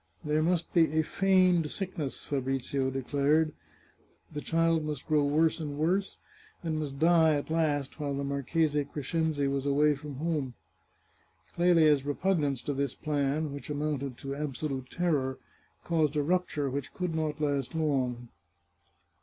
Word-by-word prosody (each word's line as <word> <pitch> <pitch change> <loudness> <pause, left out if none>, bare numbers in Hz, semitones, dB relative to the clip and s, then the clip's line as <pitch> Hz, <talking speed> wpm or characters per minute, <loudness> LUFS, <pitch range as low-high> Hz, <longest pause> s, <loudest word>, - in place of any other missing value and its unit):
There 150 0 +1
must 170 +1 0
be 160 -3 +3
a - - +3
feigned 185 -3 +3
sickness, 175 -8 -4
Fabrizio 135 0 -1
declared; 145 +4 +1 0.8
the 150 - -4
child 165 0 +2
must 150 -3 -4
grow 150 -2 +3
worse 155 +4 +2
and 145 -3 -4
worse, 185 +6 0 0.5
and 160 -2 -1
must 140 -3 -4
die, 160 0 +5
at 145 +2 -3
last, 150 -3 0
while 145 -2 -2
the 140 - -2
Marchese 145 +2 0
Crescenzi 150 0 -1
was 140 0 -1
away 150 +2 +4
from 145 0 -8
home. 145 -4 -2 1.0
Clelia's 165 -5 +4
repugnance 145 -2 0
to 145 - -2
this 140 0 -2
plan, 145 0 -1
which 140 - -8
amounted 145 -3 -2
to 135 0 -5
absolute 140 -2 -4
terror, 145 -7 0 0.5
caused 160 -3 +1
a 150 - +2
rupture 165 -3 0
which 135 0 -4
could 180 -3 -2
not 155 -2 -2
last 145 -1 -1
long. 130 -6 -1
150 Hz, 145 wpm, -29 LUFS, 140-160 Hz, 1.0 s, die